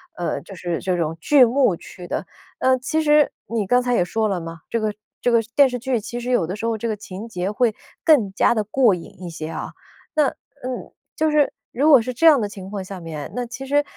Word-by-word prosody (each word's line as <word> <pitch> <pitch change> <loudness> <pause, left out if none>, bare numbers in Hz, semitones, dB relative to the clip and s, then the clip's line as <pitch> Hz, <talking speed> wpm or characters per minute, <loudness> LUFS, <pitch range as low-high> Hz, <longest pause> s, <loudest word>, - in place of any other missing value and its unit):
呃， 175 - -2
就 195 - -12
是 170 -1 -3
这 185 -2 -1
种 165 -1 -2
巨 280 - +6
幕 245 -5 +3
去 175 +1 -11
的。 - - -3 0.3
呃， 260 0 +3
其 310 +5 -1
实 300 -1 +4 0.2
你 225 -3 -1
刚 250 +5 +3
才 245 -1 0
也 175 - +2
说 220 +3 0
了 190 -3 -1
嘛， 165 -1 -8
这 230 - 0
个 215 -1 -1 0.3
这 245 - +1
个 230 -1 +5
电 280 -2 +7
视 250 -1 -4
剧 250 -1 0
其 235 +3 -6
实 245 +1 -5
有 225 -10 +2
的 185 +4 -4
时 225 - -8
候 225 -1 0
这 230 - -3
个 215 - -1
情 200 +2 -8
节 185 -2 -3
会 225 0 +2 0.3
更 255 - +4
加 - - +3
地 215 -2 0
过 230 -1 +3
瘾 175 0 -8
一 - - -5
些 160 -1 -6
啊， - - -5 0.4
那 300 -3 +3 0.3
嗯， 255 0 -5 0.2
就 315 0 +1
是 295 -2 +3 0.2
如 290 +6 +2
果 275 -5 +9
是 250 +3 -3
这 330 +7 +4
样 295 -5 +7
的 210 - -1
情 195 -2 -9
况 200 -2 -4
下 190 -1 -7
面， 160 -3 -7
那 245 -1 -2
其 260 +3 -7
实 290 +2 +2
225 Hz, 265 characters per minute, -22 LUFS, 185-255 Hz, 0.4 s, 果